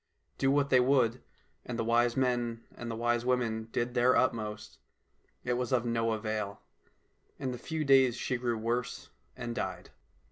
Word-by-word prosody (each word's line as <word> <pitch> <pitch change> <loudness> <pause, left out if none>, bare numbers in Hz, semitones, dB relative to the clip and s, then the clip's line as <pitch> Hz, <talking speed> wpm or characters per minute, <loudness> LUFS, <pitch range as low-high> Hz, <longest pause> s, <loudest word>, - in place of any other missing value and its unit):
Do 135 - +3
what 140 0 +2
they 130 - +7
would 125 -2 +3 0.2
— - - -41
and 120 - -5
the 115 - 0
wise 120 +1 +2
men 120 -3 0
and 120 - -7
the 115 - -3
wise 120 +1 +1
women 115 -3 0
did 120 0 -1
their 125 +1 +4
utmost 110 -4 -1 0.3
— - - -41
it 125 - 0
was 125 -2 -2
of 125 -2 +2
no 115 -1 +1
avail. 110 -2 -3 0.8
In 130 -1 -3
a - - -5
few 160 -1 -3
days 135 -3 +5
she 125 0 -2
grew 120 -2 -1
worse 120 +3 -3 0.3
and 120 -2 -4
died. - - -4
120 Hz, 180 wpm, -31 LUFS, 115-125 Hz, 0.8 s, they